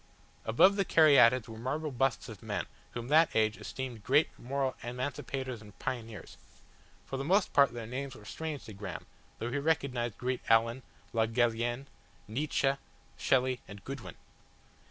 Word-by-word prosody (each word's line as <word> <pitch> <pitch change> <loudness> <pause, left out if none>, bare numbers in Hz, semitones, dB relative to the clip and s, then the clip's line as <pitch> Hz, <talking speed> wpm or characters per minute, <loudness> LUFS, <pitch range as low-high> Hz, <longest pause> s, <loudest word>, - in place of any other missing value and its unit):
Above 185 - +5
the 195 - +3
caryatids 130 - +6
were 110 -1 -9
marble 150 +5 -2
busts 130 -1 0
of - - -9
men - - -2 0.3
whom 120 0 -4
that 155 +4 +6
age 110 0 +3
esteemed 125 -5 -6
great 145 +7 +4
moral 135 +1 -1
emancipators 130 0 -4
and 105 -2 -14
pioneers; 115 -6 -5 0.7
for 135 - -4
the 135 - -2
most 190 +7 +2
part 140 -4 +6
their 120 -2 -6
names 130 +3 -5
were 105 - -13
strange 155 +3 -5
to 110 - -9
Graham, 100 +1 -6 0.3
though 120 +2 -3
he 145 - 0
recognised 140 -7 0
Grant 125 0 -2
Allen, 115 +3 +4 0.3
Le 110 -1 +2
Gallienne, 120 +2 0 0.4
Nietzsche, 135 +3 +1 0.4
Shelley 130 -1 +2
and 100 -1 -10
Goodwin. 135 -2 -7
125 Hz, 155 wpm, -31 LUFS, 115-140 Hz, 0.7 s, caryatids